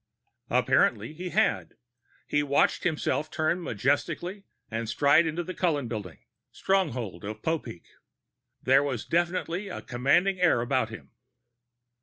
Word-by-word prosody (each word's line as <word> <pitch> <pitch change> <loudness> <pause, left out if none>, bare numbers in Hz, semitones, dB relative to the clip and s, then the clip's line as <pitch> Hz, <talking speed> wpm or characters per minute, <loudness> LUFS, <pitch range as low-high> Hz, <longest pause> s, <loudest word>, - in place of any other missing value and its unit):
_ - - +3
Apparently 110 +8 +2
he 180 +3 -6
had. 215 +3 0 0.5
He 145 - +1
watched 140 -1 +2
himself 155 -1 -1
turn 160 +3 0
majestically 165 - -1 0.3
and 115 0 -3
stride 145 +7 +4
into 165 +2 -2
the 185 - -6
Cullen 150 -9 0
Building, 105 -7 -6 0.3
stronghold 130 - -1
of 105 +2 -7
Popeek. 135 - -3 0.8
There 135 +2 +5
was 135 -6 -3
definitely 175 +2 -1
a 185 - -7
commanding 175 +10 +2
air 175 -9 +4
about 125 -2 0
him. 115 - -11
145 Hz, 130 wpm, -27 LUFS, 120-175 Hz, 0.8 s, There